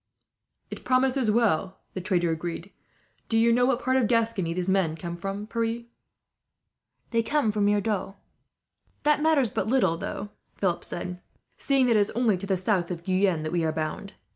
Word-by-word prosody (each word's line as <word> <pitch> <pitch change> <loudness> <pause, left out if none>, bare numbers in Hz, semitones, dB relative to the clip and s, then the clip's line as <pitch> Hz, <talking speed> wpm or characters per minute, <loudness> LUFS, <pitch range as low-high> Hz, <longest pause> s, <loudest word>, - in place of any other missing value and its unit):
"It - - -7
promises 255 -1 +2
well," 205 -5 +1
the 185 - -4
trader 175 -2 +1
agreed. 170 +3 -5 0.6
"Do 225 - +2
you 230 +1 +4
know 245 +1 +3
what 260 -2 0
part 260 +1 +2
of 250 -4 +2
Gascony 225 -7 +1
these 180 +1 -2
men 190 -5 +1
come 170 +1 -6
from, 195 +4 -5
Pierre?" 230 +1 -2 1.3
"They 230 -1 +2
come 230 -1 +1
from 205 -1 0
near 205 0 +3
Dax." 200 -2 -2 0.9
"That 300 0 +3
matters 295 -9 +2
little," 205 -3 0 0.2
Philip 180 -3 -1
said, 180 +1 -5 0.4
"seeing 275 -2 +2
that 235 -2 +3
it - - +5
is 205 - +2
only 235 -4 +3
to 195 +2 -6
the 190 -1 +1
south 185 -2 0
of 170 -2 -5
Guyenne 185 -3 +1
that 155 - -3
we 175 -1 0
are 160 - +1
bound. 155 +6 -4
205 Hz, 175 wpm, -26 LUFS, 180-235 Hz, 1.3 s, it